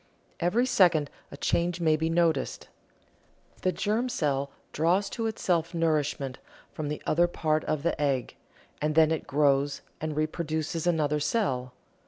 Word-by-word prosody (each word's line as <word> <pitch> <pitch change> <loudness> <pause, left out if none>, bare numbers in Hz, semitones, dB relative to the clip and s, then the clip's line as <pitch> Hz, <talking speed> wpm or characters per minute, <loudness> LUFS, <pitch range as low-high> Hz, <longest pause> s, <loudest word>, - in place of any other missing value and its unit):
Every 205 +9 +2
second 175 - +3 0.2
a 140 - -10
change 175 +4 0
may 160 -2 +3
be 160 +1 -1
noticed. 165 -4 0 0.9
The 185 - +2
germ 220 +7 0
cell 140 - 0 0.2
draws 175 +6 +2
to 225 -1 -2
itself 175 -6 -1
nourishment 150 -5 0 0.3
from 155 - -4
the 150 +1 -4
other 175 +3 +3
part 155 -2 0
of 155 -2 -1
the 170 -3 0
egg, 135 -4 0 0.5
and 150 0 0
then 160 -1 +5
it 160 - -2
grows 140 0 +2 0.2
and 155 -1 -3
reproduces 155 +1 -2
another 150 -3 +2
cell. 130 - -1
155 Hz, 145 wpm, -28 LUFS, 145-175 Hz, 0.9 s, then